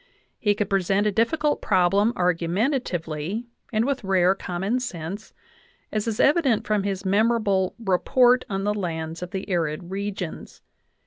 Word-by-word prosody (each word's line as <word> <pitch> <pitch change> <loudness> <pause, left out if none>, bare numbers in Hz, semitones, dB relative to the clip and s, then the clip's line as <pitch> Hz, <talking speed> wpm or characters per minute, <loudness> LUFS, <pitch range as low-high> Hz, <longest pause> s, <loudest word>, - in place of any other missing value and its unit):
He 205 -2 +2
could 210 -1 -1
present 195 +1 +1
a 210 - +2
difficult 295 +8 +1
problem 195 +3 +3
argumentatively 180 - -1 0.3
and 220 0 +1
with 275 -3 -1
rare 190 -1 +3
common 195 +5 -2
sense, 195 -3 -6 0.6
as 215 +1 -2
is 225 -1 -2
evident 280 -7 +3
from 210 -1 +1
his 195 -1 -3
memorable 200 -2 +2
Report 245 +5 +3
on 195 -1 -2
the 205 +1 +1
Lands 165 -4 -4
of 180 - -5
the 190 +1 -5
Arid 170 -2 -2
Regions. 195 -3 -5
195 Hz, 140 wpm, -24 LUFS, 180-225 Hz, 0.6 s, problem